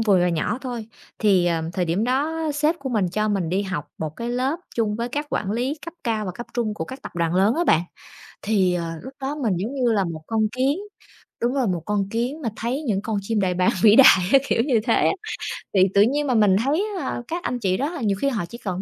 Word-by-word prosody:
vừa 205 Hz, -5 st, +4 dB
và 180 Hz, -, +3 dB
nhỏ 175 Hz, +8 st, -1 dB
thôi. 240 Hz, -4 st, -5 dB, 0.3 s
Thì, 190 Hz, -5 st, +3 dB
ờ, 165 Hz, -2 st, +1 dB
thời 180 Hz, 0 st, 0 dB
điểm 175 Hz, +7 st, 0 dB
đó 300 Hz, +6 st, 0 dB
sếp 305 Hz, +3 st, +1 dB
của 275 Hz, -, -5 dB
mình 210 Hz, -7 st, +1 dB
cho 215 Hz, +4 st, -1 dB
mình 195 Hz, -5 st, 0 dB
đi 190 Hz, +4 st, 0 dB
học 190 Hz, -7 st, -4 dB
một 155 Hz, -1 st, -4 dB
cái 235 Hz, +1 st, -4 dB
lớp 260 Hz, +6 st, 0 dB, 0.2 s
chung 215 Hz, -2 st, 0 dB
với 235 Hz, +1 st, -2 dB
các 290 Hz, +4 st, -3 dB
quản 195 Hz, -, -1 dB
lý 245 Hz, +7 st, -1 dB
cấp 335 Hz, -, -7 dB
cao 220 Hz, -2 st, 0 dB
và 185 Hz, -, -2 dB
cấp 240 Hz, -, -7 dB
trung 225 Hz, -3 st, -1 dB
của 160 Hz, -, -4 dB
các 260 Hz, +7 st, -9 dB
tập -, -, -8 dB
đoàn 170 Hz, 0 st, 0 dB
lớn 200 Hz, +6 st, +3 dB
á 345 Hz, +2 st, +1 dB
bạn. 160 Hz, -, +4 dB, 0.6 s
Thì, 195 Hz, -4 st, +2 dB
ờ, 175 Hz, -1 st, -1 dB, 0.2 s
lúc 260 Hz, -, -9 dB
đó 275 Hz, +2 st, -2 dB
mình 235 Hz, -10 st, 0 dB
giống 215 Hz, +10 st, -3 dB
như 250 Hz, -4 st, +1 dB
là 200 Hz, -3 st, +2 dB
một 165 Hz, -3 st, -5 dB
con 220 Hz, -1 st, 0 dB
kiến, 265 Hz, +7 st, +1 dB, 0.6 s
đúng 245 Hz, +3 st, +1 dB
là 260 Hz, -4 st, +1 dB
một 175 Hz, -4 st, -1 dB
con 205 Hz, -2 st, -1 dB
kiến 245 Hz, +8 st, -2 dB
mà 230 Hz, -, -1 dB
thấy 245 Hz, +7 st, -2 dB
những 215 Hz, -9 st, 0 dB
con 220 Hz, -2 st, -2 dB
chim 215 Hz, +1 st, -1 dB
đại 180 Hz, -2 st, +1 dB
bàng 180 Hz, 0 st, +3 dB
vĩ 215 Hz, 0 st, +7 dB
đại 195 Hz, -9 st, +8 dB
á, 275 Hz, -, +8 dB
kiểu 230 Hz, -, +2 dB
như 240 Hz, -6 st, +3 dB
thế 230 Hz, -, +3 dB
á. -, -, +3 dB, 0.6 s
Thì 190 Hz, -1 st, +5 dB
tự 200 Hz, -, +5 dB
nhiên 285 Hz, +7 st, +2 dB
mà 255 Hz, -, +2 dB
mình 205 Hz, -3 st, +5 dB
thấy, 315 Hz, +9 st, +1 dB, 0.2 s
à, -, -, -3 dB
các 345 Hz, +2 st, -4 dB
anh 245 Hz, -, -2 dB
chị 185 Hz, -3 st, +1 dB
đó 285 Hz, +4 st, -1 dB
là 340 Hz, -, -6 dB
nhiều 200 Hz, -4 st, +1 dB
khi 275 Hz, -, +2 dB
họ 220 Hz, -9 st, -2 dB
chỉ 235 Hz, -, -10 dB
cần 190 Hz, -5 st, -4 dB
220 Hz, 265 wpm, -23 LUFS, 190-260 Hz, 0.6 s, đại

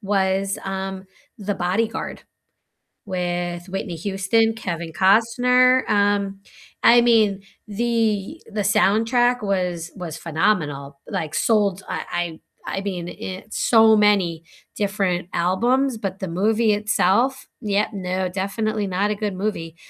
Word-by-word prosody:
was, 195 Hz, -1 st, 0 dB
um, 190 Hz, 0 st, -4 dB, 0.3 s
The 205 Hz, -1 st, -2 dB
Bodyguard, 195 Hz, +6 st, -2 dB, 0.8 s
with 175 Hz, -2 st, -3 dB
Whitney 190 Hz, -1 st, -4 dB
Houston, 195 Hz, +5 st, +1 dB
Kevin 170 Hz, -7 st, -5 dB
Costner, 250 Hz, +7 st, +4 dB
um, 200 Hz, -1 st, +1 dB, 0.4 s
I 240 Hz, +1 st, +7 dB
mean, 220 Hz, -5 st, +3 dB, 0.3 s
the 225 Hz, +4 st, -1 dB
the 210 Hz, 0 st, -2 dB
soundtrack 225 Hz, +5 st, +2 dB
was 180 Hz, -4 st, -2 dB
was 175 Hz, -5 st, -6 dB
phenomenal, 150 Hz, -5 st, -1 dB
like, 155 Hz, -1 st, -4 dB
sold, 200 Hz, -2 st, +1 dB
I 175 Hz, -2 st, -3 dB, 0.3 s
I -, -, -4 dB
I -, -, -1 dB
mean, 180 Hz, -4 st, -4 dB
it 190 Hz, +5 st, -8 dB
so 220 Hz, -2 st, +5 dB
many 195 Hz, -6 st, +2 dB, 0.3 s
different 195 Hz, -3 st, -1 dB
albums, 235 Hz, +9 st, +1 dB
but 195 Hz, -3 st, -5 dB
the 190 Hz, -, -4 dB
movie 215 Hz, +5 st, +2 dB
itself 210 Hz, +5 st, +1 dB
yeah, 210 Hz, -2 st, 0 dB
no, 185 Hz, -1 st, -2 dB
definitely 205 Hz, +3 st, -2 dB
not 195 Hz, +3 st, 0 dB
a -, -, -1 dB
good 205 Hz, -1 st, -3 dB
movie, 185 Hz, -5 st, -3 dB
195 Hz, 120 wpm, -22 LUFS, 180-220 Hz, 0.8 s, I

